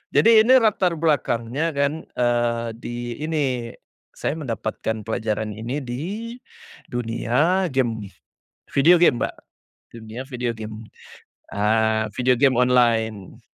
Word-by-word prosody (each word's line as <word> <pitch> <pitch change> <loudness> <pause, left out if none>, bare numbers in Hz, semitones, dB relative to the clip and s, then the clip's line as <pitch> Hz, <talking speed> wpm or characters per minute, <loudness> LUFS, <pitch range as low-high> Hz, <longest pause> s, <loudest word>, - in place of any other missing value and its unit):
Jadi 225 -1 +7
ini 250 +3 +5
latar 200 -6 +2
belakangnya 145 -1 0
kan, 140 +2 -1 0.2
eee, 120 -1 +1
di 120 0 -6
ini, 135 -7 -1 0.4
saya 145 - -3
mendapatkan 110 -5 -4
pelajaran 110 -1 -2
ini 120 +6 -4
di, 180 - -5 0.6
dunia 125 +10 +1
game, 115 -6 -1 0.6
video 165 +6 +6
game 135 -8 +4
Mbak, - - -3 0.6
dunia 115 +1 -8
video 125 -2 -3
game. 110 0 -7 0.7
Ah, 110 +1 +1
video 125 0 +2
game 130 0 +3
online, 115 -5 +1
120 Hz, 110 wpm, -22 LUFS, 115-150 Hz, 0.7 s, Jadi